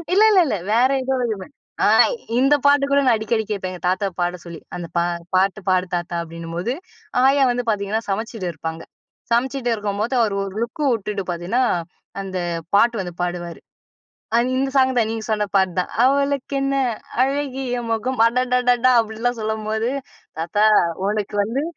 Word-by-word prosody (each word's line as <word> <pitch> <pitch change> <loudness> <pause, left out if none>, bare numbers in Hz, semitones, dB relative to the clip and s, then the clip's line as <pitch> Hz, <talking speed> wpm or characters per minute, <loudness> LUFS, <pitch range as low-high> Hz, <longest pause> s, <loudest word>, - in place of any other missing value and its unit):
இல்ல 420 - +6
இல்ல 380 -3 +6
இல்ல. 235 - 0 0.2
வேற 245 +3 +4
ஏதோ 265 +1 0
வருமே! 215 -5 -3 0.4
ஆ, - - +5 0.5
இந்த 275 +3 +5
பாட்டு 285 0 +5
கூட 280 - +5
நான் 240 -3 +5
அடிக்கடி 220 +1 -1
கேப்பேன். 195 -3 -3
எங்க 180 - -9
தாத்தாவ 195 +2 0
பாட 175 +1 -1
சொல்லி. 170 -1 -8 0.2
அந்த 175 -1 -5
"பா 170 - +3 0.3
பாட்டு 195 +2 +2
பாடு 185 0 +2
தாத்தா!" 175 0 -3
அப்பிடின்னும்போது, 170 +6 -4 0.5
ஆயா 275 +1 +5
வந்து 245 0 -1
பாத்தீங்கன்னா 210 +1 0
சமச்சிட்டு 220 -1 -3
இருப்பாங்க. 160 +1 -6 0.5
சமச்சிட்டு 245 +1 +1
இருக்கும்போது, 210 +3 -2
அவருஒரு 200 -3 -1
லுக் 235 +6 -6
விட்டுட்டு 210 -2 -3
பாத்தீங்கன்னா, 175 +9 0 0.6
அந்த 190 -1 -5 0.4
பாட்டு 230 0 +3
வந்து 175 -1 -6
பாடுவாரு. 175 -1 -4 0.8
அ - - +5 0.2
இந்த 270 +1 0
சாங் 260 -1 +3
தான். 220 -1 +1
நீங்க 225 -1 -4
சொன்ன 210 -1 0
பாட்டு 190 -2 +2
தான். 180 - -2
அவளுக்கு 280 0 +1
என்ன 275 0 0 0.5
அழகிய 265 -3 -2
முகம், 225 +2 0
அடடடடா! 250 0 +2
அப்பிடின்லாம் 225 +2 -3
சொல்லும்போது, 220 +2 -2 0.5
தாத்தா 175 +6 +1 0.4
உனக்கு 210 0 -2
வந்து 250 +7 -2
220 Hz, 155 wpm, -21 LUFS, 190-255 Hz, 0.8 s, இல்ல